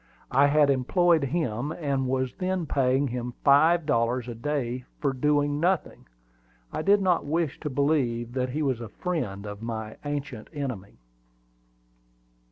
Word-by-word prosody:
I 140 +3 +5
had 145 -1 +4
employed 160 +4 +3
him, 140 -3 -2
and 140 -5 -1
was 130 -1 -1
then 185 -2 -1
paying 135 -1 +2
him 125 0 -4
five 160 +4 +5
dollars 120 -2 +1
a 120 - -4
day 125 0 -2 0.2
for 140 -2 0
doing 145 +2 +1
nothing. 180 - -1 0.7
I - - -2
did 200 +3 +4
not 180 -2 +2
wish 160 -1 -1
to 150 - -4
believe 130 -5 0
that 130 -1 -1
he 150 +4 -2
was 130 -4 0
a 115 - -6
friend 110 - -3
of 105 0 -7
my 110 -1 -5
ancient 145 -5 -4
enemy. 125 -10 -5
140 Hz, 150 wpm, -26 LUFS, 120-150 Hz, 0.7 s, I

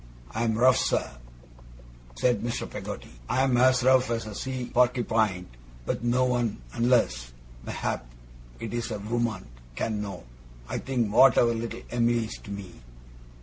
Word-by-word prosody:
I 115 +2 -1
am 110 -1 +1
rough, 125 +2 +5
sir,' - - 0 1.1
said 120 -4 +2
Mr. 120 0 -3
Peggotty, - - -7 0.2
'I 130 - +2
am 130 -2 +2
as 130 0 +4
rough 130 -1 +4
as 115 -1 -1
a 110 - -7
Sea 130 +3 -4
Porkypine; 115 -6 +2 0.4
but - - -2
no 125 +2 +2
one, 120 - 0
unless, 90 - +1 0.3
mayhap, - - -3 0.5
it 115 - -5
is 120 0 -2
a 110 - -3
woman, 110 -1 -2 0.3
can 110 - -2
know, 100 -6 -6 0.4
I - - -3
think, 120 -6 -1
what 130 +1 +7
our 115 -1 +4
little 115 0 -5
Em'ly 120 -1 +2
is 110 - -7
to - - -11
me. 100 -9 -8
115 Hz, 155 wpm, -27 LUFS, 110-125 Hz, 1.1 s, what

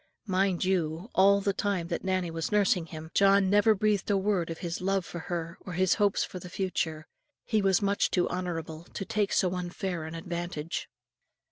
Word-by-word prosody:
Mind 190 -2 +1
you, 175 +1 -1
all 200 +1 +5
the 200 0 +1
time 190 -4 -1
that 170 - -2
Nannie 185 -2 0
was 165 0 -3
nursing 200 -4 +2
him, 160 0 -9
John 195 -1 +4
never 205 +2 +5
breathed 210 -1 +1
a 200 - +3
word 190 -4 0
of 165 - -4
his 170 0 -4
love 195 -1 0
for 175 - -6
her 170 -1 -4
or 180 - -7
his 185 +1 +3
hopes 205 -2 +2
for 185 - -6
the 180 - -9
future, 160 -5 -2 0.4
he 220 -2 +1
was 195 0 +3
much 200 0 +2
too 175 -1 +1
honourable 165 -3 -4
to 195 - -3
take 205 +1 0
so 185 -1 +2
unfair 180 -1 -3
an 160 +1 -6
advantage. 170 -1 -4
185 Hz, 195 wpm, -29 LUFS, 170-195 Hz, 0.4 s, all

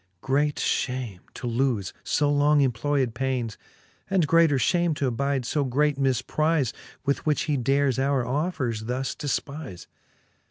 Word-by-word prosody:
Great 145 +2 +1
fhame 125 -7 -2 0.2
to - - -7
lofe 120 -5 0
fo 150 - +1
long 145 +1 +3
employed 130 0 +1
paines, 125 -3 -2 0.5
And 190 -4 +3
greater 165 -2 +4
fhame 170 +6 +2
t'abide 140 0 0
fb 135 +2 -1
great 145 +2 +1
miiprize, 135 +2 +1 0.3
With 140 0 0
which 150 - +2
he 150 - 0
dares 135 +1 +1
our 135 -2 +1
offers 130 -6 -2
thus 125 +2 -2
defpize. 140 - -4
135 Hz, 130 wpm, -25 LUFS, 125-145 Hz, 0.5 s, greater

